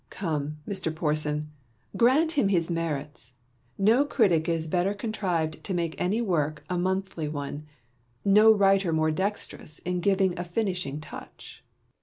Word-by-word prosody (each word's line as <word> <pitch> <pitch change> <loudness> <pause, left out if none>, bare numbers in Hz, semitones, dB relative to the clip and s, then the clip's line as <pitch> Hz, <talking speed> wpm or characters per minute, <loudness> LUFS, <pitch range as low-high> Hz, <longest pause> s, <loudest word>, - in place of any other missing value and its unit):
Southey. - - -15
Come, 150 -5 -2
Mr. 185 -5 -2
Porson, 150 -1 -1 0.4
grant 280 +7 +4
him 280 -10 +2
his 175 -3 +1
merits: 150 -6 -4 0.4
no 225 +7 +4
critic 190 - +2
is 165 -1 0
better 180 +5 0
contrived 185 -8 -2
to 190 - -3
make 170 -2 -1
any 205 +6 +1
work 155 -6 -1
a - - 0
monthly 185 -3 -1
one, 145 0 -5 0.6
no 210 +2 +7
writer 195 -3 +3
more 155 0 +2
dexterous 190 -3 -4
in 180 +1 -3
giving 190 -1 +1
a - - -1
finishing 180 -6 -2
touch. 155 - -11
175 Hz, 145 wpm, -27 LUFS, 155-200 Hz, 0.6 s, no